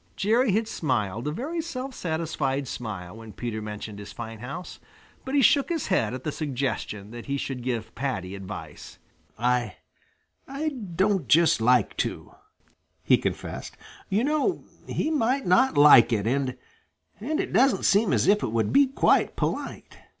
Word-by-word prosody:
Jerry 225 +3 +2
had 220 +2 +1
smiled 115 - -2
a - - 0
very 300 - -3
self 270 -5 -6
satisfied 155 - -2
smile 105 -5 -6
when 110 -2 -11
Peter 110 0 -4
mentioned 105 0 -7
his 100 - -9
fine 115 -2 -8
house, 140 +10 -7 0.4
but 265 +2 -3
he 280 - +4
shook 280 +6 +4
his 330 -4 -2
head 115 - +1
at 130 - -8
the 155 - -2
suggestion 130 -8 -3
that 120 0 -9
he 140 0 -1
should 135 -2 -4
give 120 -3 -3
Paddy 105 -9 -3
advice. 95 -6 -9 0.4
"I 120 -2 0 0.7
I 280 +4 -2
don't 195 - -1
just 160 0 +4
like 120 -2 +3
to," - - -3 0.7
he - - +4
confessed. - - -5 0.3
"You 210 +5 +1
know, 305 +6 0 0.2
he 315 - -1
might 265 -2 +1
not 240 - +3
like 120 -5 +8
it 105 -3 0
and 130 +1 0 0.6
and 300 +9 -2
it 375 - -3
doesn't 260 -7 +3
seem 205 +1 +3
as - - +2
if 205 +1 +4
it - - -1
would 115 -1 0
be 280 0 +6
quite 265 - +2
polite." - - -4
140 Hz, 165 wpm, -26 LUFS, -, 0.7 s, like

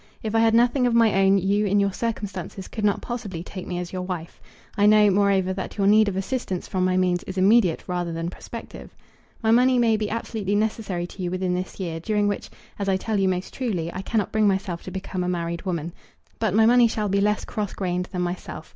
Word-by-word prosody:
If 220 -1 -3
I 225 - +3
had 225 0 +4
nothing 245 +2 +3
of 235 - +1
my 230 -2 +5
own 195 0 +4
you, 200 +2 +1
in 205 +1 +3
your 200 -1 +1
circumstances, 200 -5 -4
could 215 - -6
not 205 -1 +1
possibly 210 -9 -5
take 185 0 -8
me 180 - -3
as 175 0 -5
your 185 - -3
wife. 180 -3 -6 0.3
I 205 -1 +4
know, 210 -1 +6
moreover, 195 -1 +2
that 190 +2 -6
your 200 - +1
need 215 +1 +5
of 200 - -1
assistance 195 -2 -3
from 185 -1 -1
my 185 0 +2
means 180 -1 +1
is 190 - -7
immediate 195 -2 +4
rather 175 -2 -2
than 165 +1 -3
prospective. - - -10 0.5
My 220 - +3
money 250 +2 +5
may 230 -2 +3
be 210 -1 -2
absolutely 215 -3 -2
necessary 210 -4 -1
to 185 - -10
you 180 - -1
within 185 0 -1
this 185 +2 -4
year, 165 -3 -3
during 205 +4 0
which, 205 - -3 0.3
as 200 -1 -1
I 190 - +2
tell 210 +2 -2
you 190 -1 +2
most 185 0 -3
truly, 180 -10 -2
I 185 - -4
cannot 210 0 -1
bring 215 -1 +3
myself 190 -3 -1
to - - -5
become 185 -1 -4
a 180 - -1
married 170 0 -3
woman. 170 -2 -2 0.5
But 215 -4 0
my 220 0 +5
money 240 +1 +6
shall 215 -2 -2
be 200 0 +1
less 210 +1 +1
cross 210 -2 -4
grained 180 -1 -2
than 180 -1 -3
myself. 175 +1 -5
195 Hz, 235 wpm, -24 LUFS, 180-215 Hz, 0.5 s, know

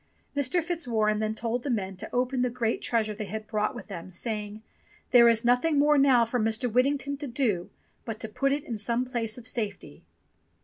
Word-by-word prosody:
Mr. 285 +5 +1
Fitzwarren 230 -11 0
then 215 0 -1
told 230 +2 -2
the 280 - -4
men 195 -5 -1
to 185 - -7
open 250 +1 0
the 250 - +2
great 235 -2 -1
treasure 220 -2 0
they 215 0 -5
had 215 +2 -5
brought 215 +1 -1
with 240 - -8
them, 185 -3 -8
saying, 210 +2 -4 0.5
"There 235 -2 +8
is 230 +1 +2
nothing 250 +6 +3
more 295 0 +5
now 260 -4 +5
for 245 +2 -1
Mr. 220 +3 0
Whittington 280 +3 +1
to 290 0 -5
do 235 -9 -1 0.3
but 225 -2 -5
to 220 - 0
put 275 +6 0
it 285 +1 -1
in 230 -3 -5
some 235 +4 0
place 235 -3 -3
of 245 - -11
safety." 200 - -4
235 Hz, 205 wpm, -27 LUFS, 215-255 Hz, 0.5 s, There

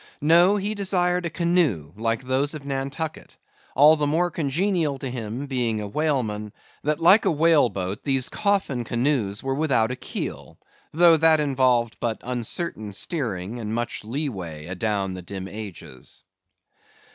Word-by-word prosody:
No: 170 +6 +5
he 205 +1 -1
desired 180 -3 0
a - - -4
canoe 160 - +1
like 115 +3 -1
those 135 +4 0
of 145 -2 -8
Nantucket, 140 +3 -4 0.4
all 150 +4 +7
the 150 -1 0
more 170 +4 +1
congenial 160 0 0
to 135 - -5
him, 120 +1 -5
being 120 -5 -1
a 105 - -4
whaleman, 110 -6 -2 0.3
that 150 +1 0
like 190 +6 +6
a - - +4
whale 155 -4 +4
boat 95 0 -5
these 135 -2 +2
coffin 195 - 0
canoes 120 -4 -1
were 135 0 -1
without 135 -6 +1
a - - -3
keel; - - -6 0.3
though 165 0 +6
that 160 0 +4
involved 130 -5 +1
but 115 -2 -2
uncertain 120 - -3
steering, 115 - -3
and 110 -1 -4
much 120 -2 -3
lee 135 +8 -3
way 85 - -7
adown 95 +1 -2
the 90 - -7
dim 95 +1 -7
ages. 95 - -10
135 Hz, 155 wpm, -24 LUFS, 110-160 Hz, 0.4 s, all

